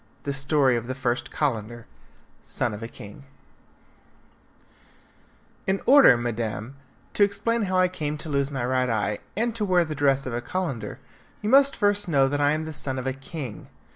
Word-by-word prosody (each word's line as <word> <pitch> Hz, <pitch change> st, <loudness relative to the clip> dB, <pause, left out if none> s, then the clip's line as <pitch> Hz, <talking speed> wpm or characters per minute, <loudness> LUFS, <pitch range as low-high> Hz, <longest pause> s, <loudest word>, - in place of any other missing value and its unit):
The 140 Hz, -, -2 dB
Story 135 Hz, -1 st, +3 dB
of 115 Hz, 0 st, -5 dB
the 130 Hz, -, -3 dB
First 120 Hz, -2 st, -1 dB
Calender, 120 Hz, -5 st, -2 dB, 0.6 s
Son -, -, -2 dB
of 105 Hz, -, -7 dB
a 115 Hz, -, -5 dB
King 105 Hz, +3 st, -12 dB, 2.4 s
In 190 Hz, +1 st, +1 dB
order, 270 Hz, -, +7 dB
madam, 120 Hz, +1 st, -4 dB, 0.4 s
to 205 Hz, -, +4 dB
explain 230 Hz, +3 st, +1 dB
how 185 Hz, -1 st, 0 dB
I 185 Hz, 0 st, +5 dB
came 150 Hz, -5 st, -4 dB
to 155 Hz, -, -6 dB
lose 140 Hz, -1 st, 0 dB
my 130 Hz, -4 st, -3 dB
right 130 Hz, 0 st, +1 dB
eye, 105 Hz, -2 st, -1 dB, 0.2 s
and 235 Hz, +1 st, 0 dB
to 220 Hz, -1 st, -2 dB
wear 180 Hz, -3 st, +3 dB
the 155 Hz, -, -4 dB
dress 140 Hz, -2 st, +1 dB
of 125 Hz, -, -4 dB
a 120 Hz, -, -2 dB
Calender, 135 Hz, -, -4 dB, 0.5 s
you 210 Hz, -, 0 dB
must 275 Hz, +1 st, +6 dB
first 205 Hz, -1 st, +1 dB
know 140 Hz, -5 st, +3 dB
that 145 Hz, +1 st, -1 dB
I 145 Hz, +1 st, +3 dB
am 155 Hz, +1 st, -2 dB
the 160 Hz, -, -6 dB
son 135 Hz, -2 st, -2 dB
of 130 Hz, -, -4 dB
a 130 Hz, -, -1 dB
king. 135 Hz, -3 st, -8 dB
140 Hz, 185 wpm, -25 LUFS, 120-185 Hz, 2.4 s, order